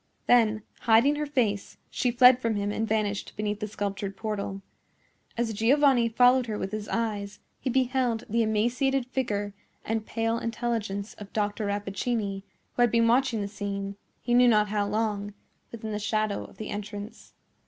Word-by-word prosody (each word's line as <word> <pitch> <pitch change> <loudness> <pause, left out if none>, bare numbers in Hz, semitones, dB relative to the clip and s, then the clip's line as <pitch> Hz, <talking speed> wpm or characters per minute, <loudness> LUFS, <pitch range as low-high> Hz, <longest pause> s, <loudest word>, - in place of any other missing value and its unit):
Then, 220 -3 +4 0.2
hiding 240 +6 +4
her 300 0 -2
face, 220 -8 -1
she 250 - 0
fled 250 +1 +7
from 230 -3 0
him 205 0 -1
and 220 +1 -1
vanished 210 -2 -1
beneath 210 0 -2
the 215 - -3
sculptured 200 -1 -4
portal. 200 -3 -4 0.7
As 230 -1 0
Giovanni 245 +2 +4
followed 245 +2 +4
her 215 -2 -3
with 195 - -4
his 215 -1 -4
eyes, 210 -3 -2 0.2
he 265 - -2
beheld 255 -2 +1
the 230 +1 +1
emaciated 240 +5 +1
figure 210 -6 -2 0.3
and 225 0 -1
pale 225 +1 -1
intelligence 225 -4 -3
of 205 -1 -10
Dr. 205 0 -1
Rappaccini, 200 0 -2 0.3
who - - -1
had 240 - +5
been 230 +1 +3
watching 240 -2 +2
the 200 - -2
scene, 200 -1 -4 0.3
he 240 - 0
knew 245 0 +6
not 210 -3 +4
how 205 -1 0
long, 205 -1 -2 0.4
within 220 -1 -6
the 210 - -2
shadow 215 0 -1
of - - -16
the 215 - -6
entrance. 205 +1 -7
220 Hz, 165 wpm, -27 LUFS, 205-240 Hz, 0.7 s, fled